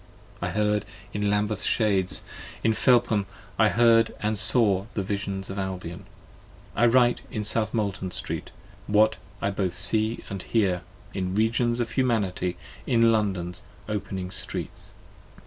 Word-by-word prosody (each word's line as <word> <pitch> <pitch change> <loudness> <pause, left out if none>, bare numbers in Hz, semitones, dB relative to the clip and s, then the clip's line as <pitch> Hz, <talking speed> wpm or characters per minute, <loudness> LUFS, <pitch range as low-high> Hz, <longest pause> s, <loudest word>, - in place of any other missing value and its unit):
I - - -1
heard 105 -1 +1 0.3
in 105 0 0
Lambeth's 105 0 0
shades: 100 -5 +2 0.4
In 110 - +3
Felpham 115 -4 +3 0.3
I 110 -1 +6
heard 115 0 +4
and 110 +1 0
saw 100 -2 +3
the 100 - 0
Visions 100 -1 -3
of 100 - -4
Albion: 90 -3 -5 0.7
I 120 - +4
write 120 0 +4
in 110 - -3
South 110 +1 +1
Molton 100 -4 -2
Street, - - -4 0.4
what 110 +1 +4 0.3
I 100 - +1
both 95 -3 -1
see 110 +3 +2
and 100 -2 -5
hear, 95 -6 +1 0.3
In 95 -1 -2
regions 115 +2 +1
of 115 -2 -1
Humanity, 105 -8 0 0.3
in 115 -1 +4
London's 95 -4 -1 0.3
opening 95 -3 -4
streets. 95 0 -3
105 Hz, 135 wpm, -26 LUFS, 95-110 Hz, 0.7 s, I